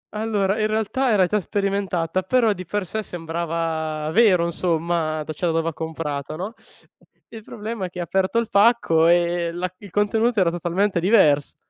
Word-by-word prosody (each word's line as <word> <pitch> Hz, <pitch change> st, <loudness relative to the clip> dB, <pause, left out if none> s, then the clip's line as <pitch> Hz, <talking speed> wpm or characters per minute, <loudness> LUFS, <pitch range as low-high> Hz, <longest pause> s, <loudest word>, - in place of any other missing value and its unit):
Allora, 210 Hz, -1 st, 0 dB
in 215 Hz, -, +2 dB
realtà 220 Hz, +4 st, 0 dB
era 200 Hz, -4 st, +4 dB
già 210 Hz, +4 st, 0 dB
sperimentata, 195 Hz, -3 st, -1 dB
però 230 Hz, +2 st, +2 dB
di 185 Hz, -1 st, -8 dB
per 205 Hz, -2 st, -2 dB
sé 220 Hz, +5 st, -3 dB
sembrava 165 Hz, -3 st, -3 dB
vero 190 Hz, -5 st, +4 dB
insomma, 165 Hz, -2 st, -1 dB
d 155 Hz, -, -6 dB
cioè 175 Hz, -, -2 dB
dove 165 Hz, 0 st, 0 dB
ha -, -, -7 dB
comprato 155 Hz, -2 st, -5 dB
no, 195 Hz, +7 st, -5 dB, 0.8 s
il 225 Hz, -, -10 dB
problema, 215 Hz, -1 st, -6 dB
è -, -, -5 dB
che 180 Hz, 0 st, -9 dB
aperto 190 Hz, +5 st, 0 dB
il 230 Hz, -2 st, +1 dB
pacco 200 Hz, -6 st, +3 dB
e 175 Hz, 0 st, +2 dB
la 180 Hz, +1 st, -4 dB
il 205 Hz, -, -12 dB
contenuto 220 Hz, +4 st, +1 dB
era 175 Hz, -3 st, +3 dB
totalmente 175 Hz, +2 st, 0 dB
divers 160 Hz, -7 st, +3 dB
180 Hz, 170 wpm, -22 LUFS, 165-210 Hz, 0.8 s, era